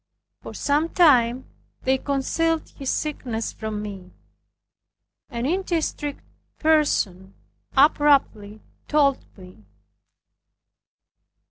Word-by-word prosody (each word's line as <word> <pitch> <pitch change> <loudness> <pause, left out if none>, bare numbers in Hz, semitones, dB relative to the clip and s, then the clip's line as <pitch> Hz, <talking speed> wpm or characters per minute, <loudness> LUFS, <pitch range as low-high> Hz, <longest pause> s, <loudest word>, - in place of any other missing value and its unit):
For - - -9
some 300 +3 0
time 255 -8 +4 0.4
they 265 0 +1
concealed 315 +4 -1
his 275 -2 -6
sickness 245 -7 -3
from 215 -1 -5
me. 195 -3 -8 1.2
An 235 +1 -4
indiscreet 325 -4 -2 0.4
person 210 - +1 0.4
abruptly 270 -8 +3 0.3
told 285 -3 +2
me. 180 - -15
270 Hz, 80 wpm, -23 LUFS, 220-300 Hz, 1.2 s, time